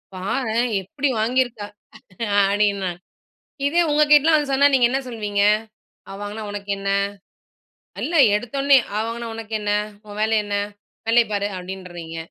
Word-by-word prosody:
பாரேன்! 230 +5 -1
எப்படி 285 - -2
வாங்கியிருக்கா?" 240 -3 0 0.8
அப்டின்னுவங்க, 200 -1 +1 0.8
இதே 330 +5 +2
உங்க 300 +1 +4
கிட்டலாம் 310 +2 +6
வந்து 295 -2 -1
சொன்னா, 280 +1 +5
நீங்க 245 -3 +5
என்ன 270 - 0
சொல்வீங்க? 210 -4 -1 0.7
அவ 195 - -8
வாங்கினா 210 +1 -6
உனக்கென்ன? 200 -1 -3 1.1
இல்ல 335 - -2 0.2
எடுத்தோன்னே, 275 +5 +3 0.2
அவ 215 - 0
வாங்கினா 230 0 -5
உனக்கென்ன? 215 -2 -3 0.4
உன் 205 0 -8
வேலை 220 +1 +2
என்ன? 205 0 -3 0.5
வேலைய 235 +1 +5
பாரு 200 0 0
அப்படீன்றீங்க. 180 -3 -8
220 Hz, 125 wpm, -22 LUFS, 205-260 Hz, 1.1 s, கிட்டலாம்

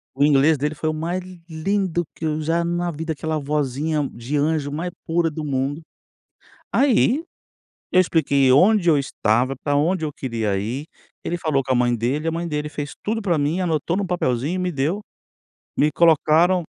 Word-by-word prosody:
O 140 - +2
inglês 145 +2 +4
dele, 150 +3 -2
foi 155 +1 -2
o - - -1
mais 170 +4 -2 0.3
lindo 175 +1 -1
que 160 - -5
eu 155 0 -1
já 165 +2 0
na 175 +1 -1
vida, 160 +1 -4
aquela 155 +1 -3
vozinha 145 +1 -1
de 120 +5 -3
anjo, 145 -1 0
mais 170 +5 -3
pura 165 0 +1
do 155 0 -6
mundo. 140 +2 -2 0.9
Aí, 275 +2 +3 0.7
eu 185 - +5
expliquei 140 -6 +2
onde 180 +6 +5
eu 155 - +5
estava, 130 -1 0
para 145 +2 -2
onde 160 +3 +1
eu 150 - -3
queria 115 -7 -2
ir, 120 +10 -4 0.4
ele 175 - -2
falou 155 -5 0
com 130 - -3
a - - +3
mãe 120 0 +2
dele, 130 +8 -1
a - - +1
mãe 170 +1 -3
dele 150 -1 -3
fez 145 -1 -5
tudo 225 +2 -1
para 180 -6 +1
mim. 150 +5 0
Anotou 165 0 0
em - - 0
um 195 - -3
papelzinho, 145 -3 -1
e - - -2
me 180 0 -1
deu, 155 +7 -1 0.8
me 150 - +3
colocaram 170 +2 +4
155 Hz, 190 wpm, -22 LUFS, 140-170 Hz, 0.9 s, eu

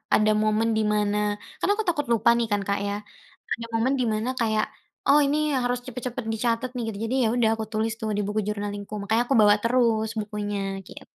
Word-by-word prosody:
ada 215 0 +4
momen 215 +1 +2
di - - +2
mana 210 0 +1 0.4
kan - - 0
aku 440 +1 -1
takut 295 -6 0
lupa 230 0 +3
nih 235 - 0
kan 205 - +2
Kak 200 0 +1
ya, 200 - -1 0.6
ada 230 - -5
momen 240 +4 +2
di 245 - +2
mana 215 +3 -1
kayak, 220 -2 +2 0.4
oh 285 +2 +7
ini 285 +2 +1
yang 265 - +1
harus 245 0 0
cepet-cepet 250 0 -5
dicatat 230 +2 0
nih 245 - -2
gitu. 215 - -4
Jadi 245 - -1
ya - - +3
udah, 230 -3 +3
aku 220 - -4
tulis 220 +1 0
tuh 220 - -2
di - - +1
buku 210 +1 -1
journaling-ku 205 0 -4
makanya 220 +3 +1
aku 270 +2 +1
bawa 205 0 +7
terus 230 -2 +2
bukunya 205 -1 -4 0.3
gitu. - - -11
225 Hz, 215 wpm, -25 LUFS, 210-245 Hz, 0.6 s, oh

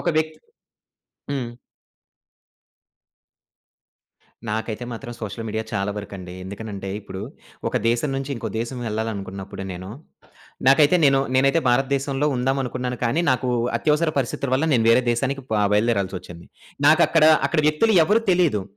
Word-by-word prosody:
ఒక - - -2
వ్యక్తి 155 0 0 0.9
హ్మ్. 130 -4 -2 3.0
నాకైతే 110 +2 -3
మాత్రం 120 +1 -7
సోషల్ 110 +1 -5
మీడియా 110 +1 -2
చాలా 100 -1 -1
వరకండి. 95 -3 -8
ఎందుకనంటే 100 0 -6
ఇప్పుడు 95 -2 -8 0.5
ఒక - - 0
దేశం 120 +5 0
నుంచి 135 +1 -4
ఇంకో 115 - -4
దేశం 120 +2 -4
ఎళ్ళాలనుకున్నప్పుడు 100 -3 -5
నేను, 90 +1 -7 0.8
నాకైతే 145 +5 +6
నేను 135 -1 +5
నేనైతే 135 +4 +3
భారత 130 +3 +3
దేశంలో 135 +1 -1
ఉందామనుకున్నాను 125 -1 -2
కానీ 120 +8 +1
నాకు 125 0 0 0.3
అత్యవసర 155 +1 +2
పరిస్థితుల 135 +1 -2
వల్ల 135 +4 +1
నేను 115 -4 +3
వేరే 125 +2 +5
దేశానికి 135 +3 -1
ప - - -2 0.2
బయలుదేరాల్సి 105 -3 +1
ఒచ్చింది. 85 -1 -12 0.4
నాకక్కడ 155 +1 +5 0.2
అక్కడ 165 - +1
వ్యక్తులు 155 +9 +3
ఎవరు 215 +6 +2
తెలీదు. 170 - +2
120 Hz, 130 wpm, -23 LUFS, 105-140 Hz, 3.0 s, నాకైతే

